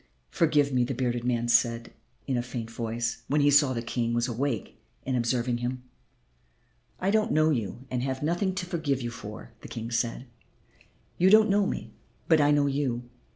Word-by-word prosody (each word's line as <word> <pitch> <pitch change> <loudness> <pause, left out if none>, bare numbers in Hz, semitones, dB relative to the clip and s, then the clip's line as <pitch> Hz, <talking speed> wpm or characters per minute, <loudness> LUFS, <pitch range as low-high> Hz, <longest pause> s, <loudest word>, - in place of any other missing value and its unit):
"Forgive 150 -4 +2
me," 125 -1 +3
the 130 +2 -3
bearded 120 -1 -1
man 120 -1 0
said 115 0 +2 0.3
in 130 - -1
a 120 - +1
faint 120 -2 -6
voice, 115 0 -3
when 145 +2 +2
he 145 0 +4
saw 145 -1 +5
that 115 - -2
the - - -12
King 115 0 -1
was 120 +1 +1
awake 120 -1 -3 0.2
and 130 - -1
observing 120 0 0
him. 125 +1 -3 1.2
"I 190 +2 +1
don't 220 +1 +2
know 155 +1 +3
you 115 -2 -3
and 125 -1 -1
have 130 +1 -3
nothing 175 +4 0
to 190 -1 -3
forgive 160 -7 -1
you 120 - -3
for," 105 - -9
the - - -9
King 115 +1 -6
said. 115 +2 -1 0.9
"You 185 +2 +5
don't 215 0 +6
know 200 0 +3
me, - - -4 0.4
but 160 -2 +5
I 145 - +4
know 145 -1 +4
you. 135 -4 -1
125 Hz, 195 wpm, -27 LUFS, 120-145 Hz, 1.2 s, don't